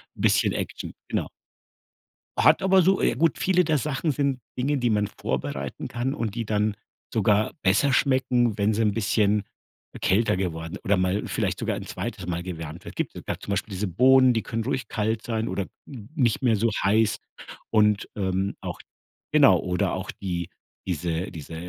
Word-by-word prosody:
'n - - -9
bisschen - - +3
Action, - - -5
genau. - - -1 1.1
Hat - - +5
aber 190 0 +5
so 190 +2 +3
ja - - +2
gut, 160 +2 +2
viele 180 -1 +3
der 155 -3 +1
Sachen 150 +2 -1
sind 140 -2 0 0.2
Dinge, 140 +3 +1
die 120 -3 +1
man 105 -1 +1
vorbereiten 70 +1 -4
kann 120 +3 -2
und 115 -6 -3
die 115 -1 -2
dann 105 0 0 0.4
sogar 105 -1 +2
besser 105 +9 +3
schmecken, 125 -5 +2
wenn 105 +1 +2
sie 115 - +1
'n 105 - +3
bisschen 105 -1 +2 0.6
kälter 100 0 +2
geworden 85 -3 -3
oder 100 0 +2
mal 95 +3 0
vielleicht - - -1
sogar - - -1
ein - - -6
2. - - -5
Mal 85 -1 -2
gewärmt 80 -2 -7
wird. - - -9
Gibt - - -2
gab - - -4
zum 100 - -5
Beispiel 100 +2 -2
diese 100 +2 -2
Bohnen, 130 +7 +5
die 115 -2 -1
können 115 0 -3
ruhig 130 -1 -2
kalt 110 +1 -1
sein 115 -1 -2
oder 100 - -2 0.2
n 120 -5 -10
nicht 125 -2 +1
mehr 115 -3 +4
so 115 +3 +2
heiß 110 +2 +3 0.5
und, 105 -1 +3
ähm, 95 0 -1
auch - - -5 0.6
genau - - +6
oder 90 -1 -1
auch - - -4
die 85 -2 -4 0.4
diese 85 +1 -2
diese 80 -1 -8
105 Hz, 180 wpm, -25 LUFS, 95-125 Hz, 1.1 s, genau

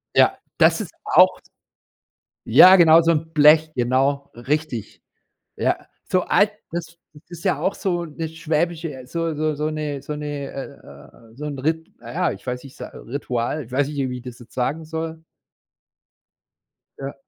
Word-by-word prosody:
Ja, - - +5 0.2
das - - +4
ist - - -7
auch - - +5 1.1
Ja 185 +1 +9
genau, 165 -2 +7
so 170 0 +3
'n 160 0 -1
Blech, 155 +1 +6
genau, 135 +3 +1
richtig. 135 -1 -3 0.5
Ja, - - +1 0.3
so 185 - +3
alt 205 +3 +3 0.2
das 170 0 -6 0.3
ist 175 -1 -10
ja 145 - +1
auch 190 +5 0
so 175 -3 -1
'ne 160 0 -5
schwäbische 160 0 -2
äh, 130 -1 -10
so 165 +2 -2
so 155 0 -1
so 150 +1 -1
'ne 150 -2 -4
so 150 - -6
'ne 145 -2 -5
äh, 135 -4 -11
äh, - - -20
so 150 +4 -7
'n 145 -2 -5
Rit 160 +4 -2
na - - -10
ja, - - +1
ich 100 - -10
weiß 125 0 -3
nicht, 135 -2 -14
s - - -8
Ritual, 125 +2 -3
ich 120 - -18
weiß 135 +1 +2
nicht, 150 - -7
wie 125 - -4
ich 125 - -11
das 125 -1 -9
jetzt 120 - -16
sagen 145 +6 -2
soll. 160 0 -5 1.7
Ja, 135 0 -6
150 Hz, 175 wpm, -22 LUFS, 135-160 Hz, 1.7 s, Ja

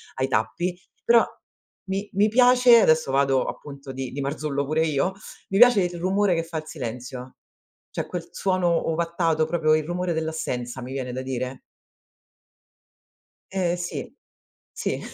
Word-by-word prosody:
ai 130 0 0
tappi, 175 +6 -1 0.3
però 235 -1 +6 0.7
mi 195 +2 -2
mi 200 +2 +4
piace 245 +1 +6
adesso 155 -6 +3
vado, 135 -1 +2
appunto, 140 -2 -8
di 130 -1 -5
di 140 - -6
Marzullo 140 0 -2
pure 155 +3 +1
io, 155 +4 0 0.4
mi 195 - 0
piace 245 -5 +7
il 175 -1 -3
rumore 190 +1 +2
che 165 - 0
fa 165 0 -6
il 155 - -5
silenzio, 125 -2 -7 0.6
cioè - - -4
quel 175 -2 -6
suono 180 -4 +1
ovattato, 165 -1 0
proprio 160 -2 +2
il 155 -1 +1
rumore 175 +1 -2
dell'assenza, 160 -6 -3
mi 125 +2 -7
viene 130 -2 -4
da 130 - -4
dire. 130 0 -4 1.9
Eh 180 -2 0
sì, 175 0 -5 0.6
sì. - - -3
160 Hz, 145 wpm, -24 LUFS, 135-180 Hz, 1.9 s, piace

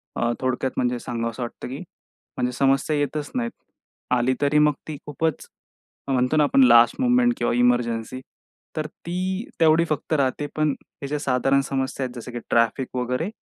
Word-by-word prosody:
अ, 120 0 +1
थोडक्यात 130 0 -1
म्हणजे 125 -1 0
सांगावंसं 115 +1 -4
वाटतं 120 - -7
की 130 +2 -6 0.6
म्हणजे 125 - 0
समस्या 135 +3 +2
येतच 145 +1 -2
नाहीत. 235 -2 -1 0.6
आली 125 +1 +2
तरी 145 +1 +3
मग 150 -1 +4
ती 150 -2 -5
खूपच 155 +1 -2 0.6
म्हणतो 130 +3 +1
ना, 150 - +5
आपण 135 -2 +4
लास्ट 120 -1 +6
मुव्हमेंट 245 -1 +4
किंवा - - 0
इमर्जन्सी 120 0 +1 0.6
तर 155 -1 -2
ती 185 +6 -4 0.2
तेवढी 165 +1 +5
फक्त 155 +1 -2
राहते. 140 0 0
पण 155 -1 +2
ह्याच्या 145 +2 -6
साधारण 135 0 +2
समस्या 135 0 -2
आहेत 125 - -7
जसं 120 +1 -7
की 120 - -5
ट्रॅफिक 115 +3 +2
वगैरे, 125 +8 -1
135 Hz, 160 wpm, -23 LUFS, 125-155 Hz, 0.6 s, लास्ट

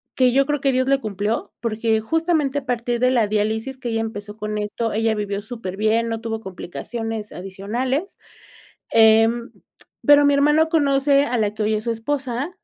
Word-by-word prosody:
que 255 -1 +4
yo 275 +1 +4
creo 295 0 -1
que 275 - +2
Dios 260 0 +1
le 275 0 +3
cumplió, 210 -1 -3
porque 220 -1 0
justamente 310 +1 0
a 275 - -16
partir 240 -1 -1
de 255 +1 +3
la 240 -4 +3
diálisis 220 +5 -1
que 250 -2 -4
ella 225 -1 -1
empezó 210 -2 -6
con 210 0 -3
esto, 215 +2 -3
ella 220 +1 +1
vivió 205 -1 -3
súper 215 -4 -7
bien, 220 +2 +1
no 225 -1 -3
tuvo 225 -1 -3
complicaciones 220 +3 -6
adicionales, 230 - -3 0.7
em, 225 +1 +4 0.5
pero 290 -1 +7
mi 285 - +4
hermano 295 +3 +4
conoce 280 -2 +3
a 245 -4 -1
la 210 -1 0
que 215 - -3
hoy 210 +1 +1
es 215 0 -2
su 235 - -1
esposa, 260 +4 -3
230 Hz, 185 wpm, -21 LUFS, 215-270 Hz, 0.7 s, pero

